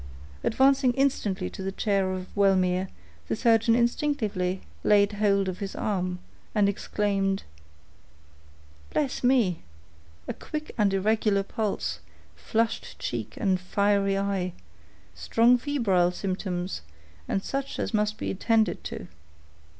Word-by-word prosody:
Advancing 265 +1 +4
instantly 215 -9 0
to 195 - -8
the 190 0 -2
chair 195 -1 0
of 185 -1 -4
Wellmere, 190 -2 +3 0.4
the - - 0
surgeon 230 0 +4
instinctively 225 -7 0 0.2
laid 205 0 +4
hold 200 -2 +2
of 185 -1 -4
his 200 -2 -5
arm, 185 -3 -1 0.4
and 205 -2 +4
exclaimed,— 195 -1 0 1.5
"Bless 275 -4 -1
me!—a 85 - -2
quick 305 0 -6
and 210 -4 +2
irregular 200 0 +2
pulse—flushed 220 +2 -3
cheek - - -4
and 190 -4 +1
fiery 200 +1 +2
eye—strong 200 +5 0
febrile 225 -11 +2
symptoms, 185 - -3 0.5
and 195 - -1
such 275 0 -3
as - - -2
must 210 0 +1
be - - -3
attended 220 +2 +1
to." - - -6
200 Hz, 110 wpm, -27 LUFS, 185-225 Hz, 1.5 s, Advancing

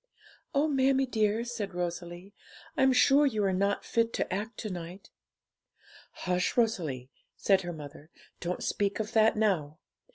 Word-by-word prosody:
'Oh, 285 +3 +3
mammie 270 -2 +3
dear,' 220 -2 +1
said 230 -6 -5
Rosalie, 175 +2 -5 0.4
'I'm 265 0 +4
sure 275 +3 +5
you 215 -6 0
are 195 -1 +2
not 200 +2 0
fit 230 0 +1
to - - -2
act 210 +4 -4
to 215 - -4
night.' 175 +2 -8 1.0
'Hush, 180 +3 -1
Rosalie!' 155 - 0 0.3
said 195 -2 +3
her 175 -1 -5
mother; 150 -1 -10 0.3
'don't 180 +1 -3
speak 200 0 -1
of 215 +1 -3
that 220 -1 +4
now. 170 -9 +1
200 Hz, 150 wpm, -29 LUFS, 175-230 Hz, 1.0 s, sure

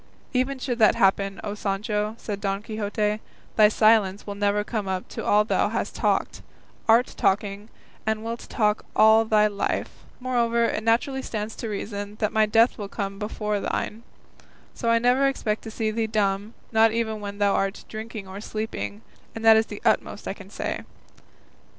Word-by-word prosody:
"Even 260 +2 0
should 250 -2 -3
that 215 - +6
happen, 195 0 +2
O 205 - -3
Sancho," 210 +1 -2
said 205 -3 -5
Don 195 0 -2
Quixote, 210 -1 -1 0.4
"thy 215 -1 +7
silence 215 -2 +3
will 205 - -4
never 205 +1 +1
come 210 -2 -3
up 185 -1 -3
to - - -6
all 210 +1 +4
thou - - +1
hast - - -2
talked, - - 0 0.5
art 235 +3 +5
talking, 200 +2 0 0.3
and 220 0 -1
wilt 230 +1 -5
talk 210 -2 +1
all 220 +1 +6
thy 215 -1 +4
life; 205 -1 -2 0.2
moreover, 235 -2 +1
it 215 - -1
naturally 245 +4 +1
stands 215 -3 -4
to 230 - -4
reason, 205 0 -5
that 215 -1 -1
my 220 0 +4
death 225 +3 +3
will 200 -1 -5
come 195 -1 -4
before 210 0 -2
thine; 215 +2 -3 0.7
so 230 - -2
I 230 - +5
never 250 +4 +3
expect 220 -5 -1
to - - -5
see 220 0 -1
thee 225 0 -1
dumb, 205 0 -1 0.2
not 225 0 +5
even 220 -1 -1
when 200 0 -6
thou 205 -1 +3
art 195 +1 -1
drinking 215 -2 -7
or 190 +2 -8
sleeping, 215 -1 -5 0.3
and 225 0 -5
that 225 0 +9
is 220 0 +3
the - - -8
utmost - - +1
I - - -2
can - - -13
say." - - -4
215 Hz, 180 wpm, -25 LUFS, 205-225 Hz, 0.7 s, that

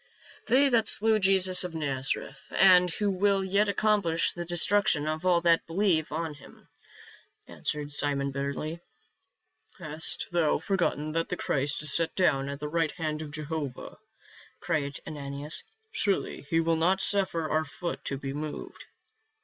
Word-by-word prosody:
" - - -23
They 265 +5 +4
that 230 -4 +2
slew 220 +1 +5
Jesus 190 -2 +4
of 180 -2 -6
Nazareth, 135 -4 -3
and 180 -2 +6
who 205 +4 -1
will 195 +1 +1
yet 200 +2 +1
accomplish 200 -5 +2
the 175 -1 -6
destruction 175 -2 +2
of 155 +3 -3
all 175 -2 +3
that 170 -1 +2
believe 165 -3 0
on 160 0 -3
him," 145 - -17 0.8
answered 150 -1 -5
Simon 140 -1 +1
bitterly. 140 +4 -4 0.5
" - - -34
Hast 155 -2 0
thou 170 -3 +2
forgotten 160 -3 -1
that 165 +1 -2
the 180 - -3
Christ 140 +2 -1
is 150 - +5
set 165 -1 +1
down 140 -7 +1
at 140 - -5
the 150 - -4
right 165 +1 0
hand 155 -3 -4
of 155 - -7
Jehovah?" 150 -3 -6 0.6
cried 140 -2 -3
Ananias. 145 0 -5 0.3
"Surely 200 - -2
he 165 - +2
will 165 0 +1
not 180 +4 +2
suffer 190 -6 +2
our 155 +1 0
foot 170 +3 -6
to 140 - -3
be 135 0 -6
moved." 150 +1 -7
165 Hz, 155 wpm, -27 LUFS, 150-185 Hz, 0.8 s, and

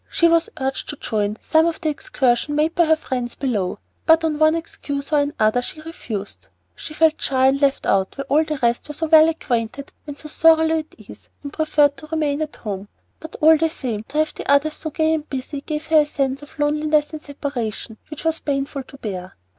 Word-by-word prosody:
She 335 - +3
was 335 0 +3
urged 265 0 -3
to 295 - -4
join 210 -5 -2
some 320 +1 +3
of 330 -1 -2
the 315 - -1
excursions 270 -1 0
made 310 +2 +1
by 345 -1 +3
her 320 0 +4
friends 250 -5 -4
below, 215 -9 -2 0.3
but 325 0 +6
on 305 -2 -1
one 310 +1 +5
excuse 285 -3 -5
or 295 - +5
another 245 -5 +1
she 310 - -8
refused. 230 -11 -7 0.3
She 305 - -9
felt 320 0 +3
shy 260 -1 +2
and 270 +2 +3
left 280 -1 +2
out 190 +3 +1
where 275 - -4
all 295 +3 +3
the 310 -1 -3
rest 235 0 +1
were 300 - -7
so 320 - -2
well 315 0 +7
acquainted 265 -4 -3 0.2
and 290 -1 -7
so 305 - -8
thoroughly 320 +1 +4
at 310 - -10
ease, - - -14
and 285 - -7
preferred 295 -2 +2
to 305 - -11
remain 305 -2 -1
at 305 -1 -4
home; 200 -2 -6 0.3
but 320 - -10
all 315 +1 +7
the 325 +1 +1
same, 240 -8 -4
to 285 - -6
have 310 0 +1
the - - -3
others 290 +2 +3
so 315 - -5
gay 315 +1 +1
and 310 -1 -3
busy 275 +2 -5
gave 300 +1 -4
her 315 -1 +5
a - - 0
sense 275 -1 -2
of 295 +2 -14
loneliness 300 0 +1
and 310 - -6
separation 245 -7 -5
which 305 +1 -8
was 325 0 +1
painful 275 -1 -2
to 275 - -14
bear. 185 -7 -6
295 Hz, 220 wpm, -21 LUFS, 265-315 Hz, 0.3 s, well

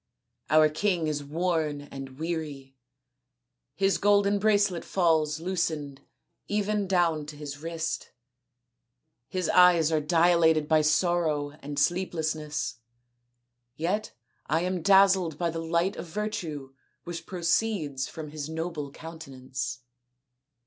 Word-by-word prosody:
Our 155 +1 +6
king 170 +2 0
is 150 -2 -2
worn 155 -1 -1
and 135 -2 -9
weary; 150 -5 -5 1.0
his 195 +2 +2
golden 205 0 +3
bracelet 205 -4 +2
falls 160 -4 +1
loosened 160 -6 -2 0.5
even 210 -1 0
down 170 -5 +1
to 150 - -8
his 145 -1 -7
wrist; 165 +1 -4 1.2
his 185 -1 -2
eyes 175 -3 +6
are 155 -1 +2
dilated 165 -1 +3
by 155 0 +4
sorrow 155 -2 +1
and 145 0 -6
sleeplessness 155 - -1 1.0
yet 190 +8 -1 0.4
I 160 +3 +1
am 180 0 -1
dazzled 190 -4 +4
by 170 0 0
the 165 0 -4
light 170 +4 0
of - - -6
virtue 165 -8 -4 0.3
which 165 -1 -7
proceeds 170 -6 0
from 155 -2 -8
his 155 -1 -5
noble 160 -3 -4
countenance." 135 -5 -6
160 Hz, 115 wpm, -27 LUFS, 150-180 Hz, 1.2 s, Our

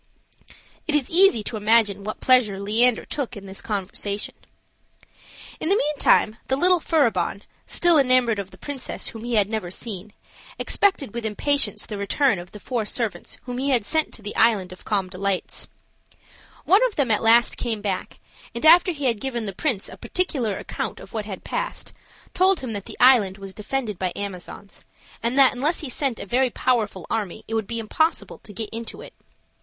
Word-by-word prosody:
It 305 - +2
is 285 -4 0
easy 345 - +5
to 220 - -3
imagine 210 -2 +3
what 215 +1 -6
pleasure 240 -7 +4
Leander 225 +4 +2
took 280 -7 -4
in 200 - -10
this 195 0 -8
conversation. 205 0 -3 1.3
In 315 - -2
the 395 - +4
meantime 285 - +2
the 265 - +1
little 360 +5 +4
Furibon, 225 - +1 0.2
still 345 -3 +4
enamored 255 -5 +3
of 195 -1 -5
the - - -16
princess 285 -3 -5
whom 225 -1 -9
he 240 0 -2
had 205 -2 +4
never 215 -5 -3
seen, 205 +1 -6 0.4
expected 375 - +1
with 235 -1 -4
impatience 225 +2 0
the 210 - -6
return 205 +2 +1
of 175 +1 -10
the 210 - -11
four 240 +1 -2
servants 210 -4 -3
whom 250 0 -5
he 275 +2 -1
had 245 -6 +2
sent 315 +6 +1
to 220 - -14
the 205 - -5
Island 195 -6 +3
of 185 - -16
Calm 200 -3 0
Delights. 190 +1 -3 1.0
One 395 +6 +5
of 455 - -10
them 270 -6 +1
at 210 - +2
last 230 +1 +4
came 230 -3 -2
back, 200 -3 -3 0.4
and 235 - -3
after 350 +3 +7
he 290 -3 -5
had 230 -5 +1
given 240 -4 -3
the 195 - -4
prince 230 -2 -1
a - - -11
particular 270 - -1
account - - -5
of - - -13
what 215 -2 -3
had 200 -3 -7
passed, - - -4 0.4
told 375 -2 +3
him 255 -3 -5
that 205 -2 -5
the - - -8
island 225 -7 +5
was 195 -1 -9
defended 215 -1 -3
by 185 -1 -1
Amazons, 200 0 -8 0.4
and 235 +3 -1
that 270 -2 +6
unless 290 +7 0
he 295 - -6
sent 255 -2 -1
a - - -7
very 250 +5 +2
powerful 220 -8 -1
army, 215 -2 -3
it 225 - -6
would 220 -3 -1
be 230 - -3
impossible 315 +9 -1
to 210 - -13
get 210 +1 -5
into 230 0 -7
it. - - -12
225 Hz, 190 wpm, -23 LUFS, 205-270 Hz, 1.3 s, after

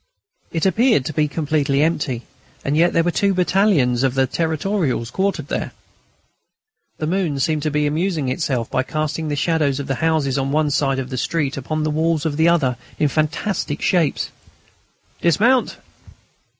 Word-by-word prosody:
It 165 +1 -1
appeared 220 - +3
to 155 - -3
be 155 0 +1
completely 145 -2 0
empty, 150 -7 -1 0.4
and 140 - 0
yet 170 +3 +4
there 165 - +2
were 175 - +1
two 200 +2 +1
battalions 180 - +2
of 135 -1 +1
the 135 0 +3
Territorials 160 - -1
quartered 195 +5 -1
there. - - -3 1.2
The 155 - -3
moon 165 -4 -1
seemed 155 +3 0
to 155 - 0
be 150 0 0
amusing 155 -1 -1
itself 130 -4 -1
by 130 - +1
casting 155 +3 -3
the 145 - -1
shadows 145 -2 +1
of 140 - -4
the 135 - -1
houses 155 -4 +1
on 135 0 -1
one 150 0 +1
side 135 -1 +1
of 130 0 -4
the 130 - -3
street 145 +1 -1
upon 155 +3 -3
the 155 - 0
walls 160 0 0
of 155 -3 -1
the 160 +2 +3
other 135 -8 +2
side - - -24
in 150 - +2
fantastic 155 +2 -1
shapes. 170 -6 +1 0.9
"Dismount." 230 - +3
155 Hz, 175 wpm, -20 LUFS, 140-165 Hz, 1.2 s, yet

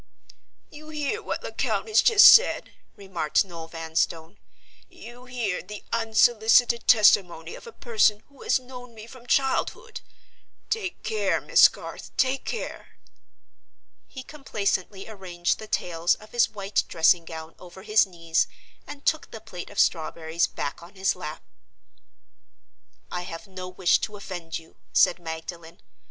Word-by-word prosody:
"You 305 +1 -12
hear 305 +8 -3
what - - -5
Lecount - - -2
has 435 - +4
just 440 -4 +7
said?" 480 - +3 0.2
remarked 190 -4 -1
Noel 165 -3 -9
Vanstone. 165 +1 -3 0.5
"You 250 -9 -13
hear 240 -7 -3
the 210 +2 -10
unsolicited 230 +1 +3
testimony 180 -7 +4
of - - -11
a - - -9
person 215 - +1
who 280 -1 -20
has - - +2
known 250 -2 -12
me 215 0 -10
from 245 +1 -15
childhood? 460 - -1 0.7
Take 400 -5 -3
care, 440 -1 0
Miss - - +6
Garth—take 260 0 -3
care!" 460 - -6 1.1
He 260 - -9
complacently 205 -9 -3
arranged 180 -5 -3
the 215 - -9
tails 170 -3 0
of 215 - -17
his 240 0 +3
white 200 -1 -1
dressing 165 +1 +3
gown 160 0 -9
over 180 +1 -13
his 215 -1 +3
knees 165 -2 0 0.4
and 290 -1 -10
took 315 - 0
the 225 - -9
plate 185 -5 -9
of 205 - -14
strawberries 160 0 +1
back 140 - -5
on 175 +4 -14
his 190 +1 0
lap. - - -7 1.7
"I 180 - -3
have 175 0 -8
no 185 -2 -8
wish 180 -1 +2
to 210 -1 -5
offend 175 -5 -6
you," 165 0 -16 0.2
said 175 - +4
Magdalen. 165 0 -8
205 Hz, 140 wpm, -25 LUFS, 170-245 Hz, 1.7 s, just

